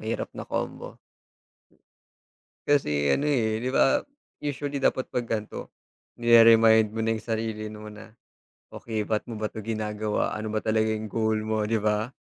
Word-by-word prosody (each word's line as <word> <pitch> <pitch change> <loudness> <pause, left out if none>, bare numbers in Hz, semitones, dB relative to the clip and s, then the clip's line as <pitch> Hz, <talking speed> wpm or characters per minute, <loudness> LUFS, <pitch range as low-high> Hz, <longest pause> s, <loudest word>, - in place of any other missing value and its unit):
mahirap 110 +1 -4
na - - -8
combo. - - -4 1.7
Kasi 75 - +2
ano, 140 - +2
eh, 115 -7 +1
di 125 +3 -2
ba 135 - +4 0.4
usually 145 0 -3
dapat 130 -1 0
pag 120 - -2
ganito 110 -2 -5 0.5
nire-remind 115 -2 +6
mo 115 - -2
na 115 - 0
yung 110 - -11
sarili 110 -1 -2
mo 105 0 -9
na, 105 0 -13 0.6
"Okey, 110 -2 -4
ba't 110 0 -2
mo 115 - -6
ba 110 0 -3
'to - - -7
ginagawa, 105 -1 -2
ano 110 0 -4
ba 110 0 -2
talaga 110 0 +1
yung 110 -1 -3
goal 110 -1 0
mo?" 110 -1 -1
di 115 - 0
ba. 105 0 0
110 Hz, 160 wpm, -26 LUFS, 105-115 Hz, 1.7 s, nire-remind